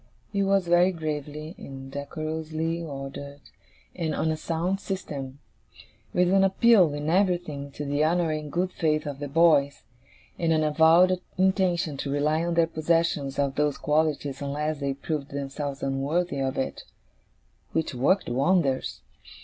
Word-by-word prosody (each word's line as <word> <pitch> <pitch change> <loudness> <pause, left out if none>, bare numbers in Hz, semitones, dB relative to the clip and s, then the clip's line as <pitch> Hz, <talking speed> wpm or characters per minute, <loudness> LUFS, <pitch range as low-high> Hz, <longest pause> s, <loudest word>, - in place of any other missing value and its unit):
It 200 - +1
was 195 -2 +2
very 175 +2 +5
gravely 155 -1 -5
and 135 0 -9
decorously 155 +3 -3
ordered, 140 -1 -7 0.6
and 165 -3 -2
on 160 - 0
a - - 0
sound 170 +4 -2
system; 140 -10 -5 0.7
with 180 +1 +2
an 195 0 +5
appeal, 195 -3 +5
in 145 +1 -4
everything, 175 -5 0
to 145 - -5
the 145 +1 +1
honour 165 +1 +2
and 155 -1 -4
good 180 +3 0
faith 155 -3 0
of 145 -2 -5
the 145 - -4
boys, 145 -2 +3 0.6
and 165 -2 +1
an 155 -1 +3
avowed 165 +4 +5 0.2
intention 185 -5 +1
to 140 - -4
rely 150 +3 +1
on 170 0 -1
their 165 -1 +5
possession 165 -3 0
of 140 -1 +1
those 150 0 0
qualities 150 -2 0
unless 150 +2 -2
they 140 -1 -2
proved 145 0 -4
themselves 140 0 -5
unworthy 140 +4 -1
of 135 -1 -1
it, 130 - -2 0.9
which 160 -3 -1
worked 140 +11 +2
wonders. 135 +1 +1
155 Hz, 150 wpm, -26 LUFS, 140-170 Hz, 0.9 s, very